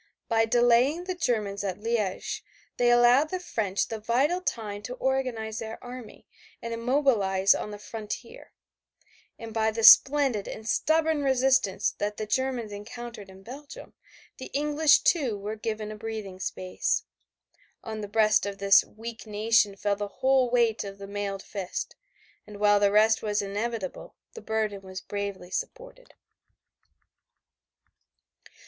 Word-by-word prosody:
By 225 0 +2
delaying 245 +7 +3
the 370 0 -3
Germans 215 - -1
at 190 -2 -3
Liège 215 -3 -2 0.4
they 245 0 +3
allowed 240 +5 +5
the 370 - -3
French 215 - -2
the 225 - -5
vital 265 +11 +1
time 210 - -4
to 250 +4 -6
organize 255 -5 -2
their 225 0 -6
army 245 -2 -10 0.3
and 230 0 -5
mobilize 225 -8 +3
on - - -4
the 205 - -7
frontier, 225 - -8 0.9
and 225 -1 -9
by 220 0 +1
the 225 +1 -3
splendid 270 -5 +6
and 220 0 -8
stubborn 315 +4 +1
resistance 265 -6 +2
that 210 0 -2
the 215 - -3
Germans 245 -1 -1
encountered 210 0 -8
in 190 0 -15
Belgium 280 +6 -11 0.5
the 260 - -6
English 295 +1 +3
too 265 - +1
were 205 +2 -5
given 215 -1 -4
a - - -7
breathing 215 -4 -6
space. 190 - -2 0.8
On 220 -1 -5
the 205 - -5
breast 215 0 +3
of 200 -1 -5
this 195 -1 +5
weak 230 +1 -9
nation 215 -1 +2
fell 200 +1 0
the 205 0 -4
whole 260 +3 +2
weight 235 -2 +2
of 200 -1 -8
the 200 - -9
mailed 200 -1 -4
fist, 195 -3 -5 0.5
and 210 -1 -10
while 205 0 +4
the 200 -1 +3
result 220 +2 +4
was 210 -1 -1
inevitable 205 0 -4 0.2
the 455 - -9
burden 215 - -2
was 185 -1 -8
bravely 200 -3 -5
supported. - - -6
220 Hz, 145 wpm, -27 LUFS, 205-255 Hz, 0.9 s, splendid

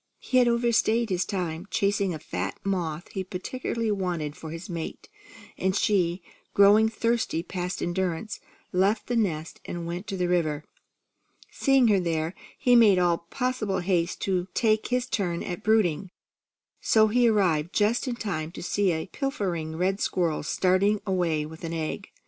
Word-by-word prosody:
He 255 - +1
had 245 - +4
overstayed 235 -1 +2
his 185 0 +1
time, 175 -1 -3
chasing 200 -1 +1
a 160 - -3
fat 95 -9 -4
moth 175 -4 -2
he 190 - -3
particularly 220 +4 -3
wanted 175 -7 -2
for 160 - -8
his 165 +5 -7
mate, 170 -4 -6 0.5
and 190 0 +1
she, 180 -4 +1 0.3
growing 205 +2 +6
thirsty 230 -7 0
past 180 0 -4
endurance, 185 +3 -2 0.3
left 195 +4 +2
the 245 - -2
nest 170 -8 -1
and 170 -1 -5
went 175 +3 -5
to 195 - -3
the 180 -1 0
river. 160 -4 0 0.9
Seeing 270 -3 +3
her 200 -2 +4
there, 165 -1 -1 0.2
he 245 -1 +4
made 215 -5 +6
all 170 -1 +1
possible 250 -7 -1
haste 175 -1 0
to 185 -2 0
take 220 -3 +2
his 250 0 0
turn 185 -9 -2
at 175 - -5
brooding, 200 -5 +2 0.7
so 220 -1 +4
he 240 +2 +4
arrived 175 -7 +2
just 220 +6 +1
in 245 - -1
time 165 -9 -3
to - - -7
see 195 +1 +1
a 160 -1 -2
pilfering 185 - -3
red 190 +4 0
squirrel 170 -7 0
starting 190 +6 +2
away 175 -6 0
with 160 +2 -11
an 165 0 -4
egg. 160 -2 -3
185 Hz, 160 wpm, -26 LUFS, 170-215 Hz, 0.9 s, growing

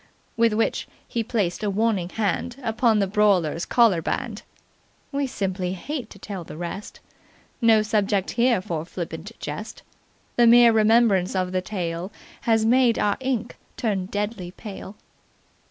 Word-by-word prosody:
With 230 -1 +3
which 225 +1 0 0.2
he 230 - -2
placed 210 -6 -1
a 210 - 0
warning 200 -3 0
hand 220 +4 -2
upon 225 -1 +2
the 200 - +2
brawler's 190 -5 +2
collarband. 225 0 +1 0.7
We 280 -1 -1
simply 185 -5 -2
hate 250 - -5
to - - -13
tell 195 -4 -6
the 155 - -10
rest. 175 +4 -6 0.6
No 225 -2 +5
subject 205 -3 0
here 235 -4 +2
for 160 -4 -3
flippant 170 +2 -6
jest. - - -6 0.5
The 240 -1 +6
mere 235 0 +8
remembrance 215 -4 +3
of 185 -1 0
the 185 0 0
tale 180 -1 -4 0.4
has 225 -1 +4
made 240 0 +4
our 205 -1 +1
ink 255 -3 -2 0.2
turn 205 -7 -1
deadly 205 -2 -3
pale. 200 +1 -9
210 Hz, 140 wpm, -24 LUFS, 185-230 Hz, 0.7 s, mere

